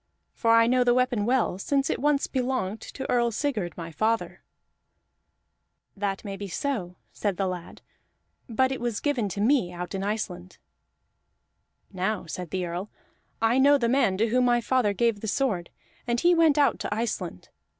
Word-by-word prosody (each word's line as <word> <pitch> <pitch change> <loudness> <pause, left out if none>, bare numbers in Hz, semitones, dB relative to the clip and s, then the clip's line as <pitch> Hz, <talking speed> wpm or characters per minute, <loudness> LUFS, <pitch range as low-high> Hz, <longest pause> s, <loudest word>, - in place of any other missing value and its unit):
For 230 - -1
I 230 0 +6
know 250 +1 +3
the 245 0 +3
weapon 250 -4 +1
well, 240 -7 +1
since 275 +5 0
once 290 0 +1
it - - -14
belonged 250 -6 -1
to 265 - -7
Earl 240 -1 +2
Sigurd 220 - -2
my 165 -1 -6
father." 225 +7 -1 1.5
"That 195 0 -3
may 200 -1 -4
be 200 +1 -6
so," 195 -5 -3 0.2
said 200 -4 -2
the 195 - 0
lad, 180 -2 -6 0.7
"but 260 +3 +2
it 265 - -4
was 240 -3 -1
given 255 -8 0
me 215 -3 +2
out 180 +1 -6
in 190 - -2
Iceland." 185 -4 -4 1.4
"Now," 190 +1 -1
said 175 +1 -6
the 185 0 -2
Earl, 175 +4 -5 0.5
"I 230 +3 +4
know 285 +2 +6
the 235 -4 0
man 240 -7 +2
to 225 +3 +1
whom 250 +2 +3
my 240 -1 +3
father 240 -3 +1
gave 230 +1 +1
the 220 - -5
sword, 210 -8 0 0.4
and 240 0 +1
he 350 +5 +4
went 325 -3 +4
out 285 -1 +3
to - - -4
Iceland. 210 - -3
225 Hz, 170 wpm, -26 LUFS, 190-255 Hz, 1.5 s, I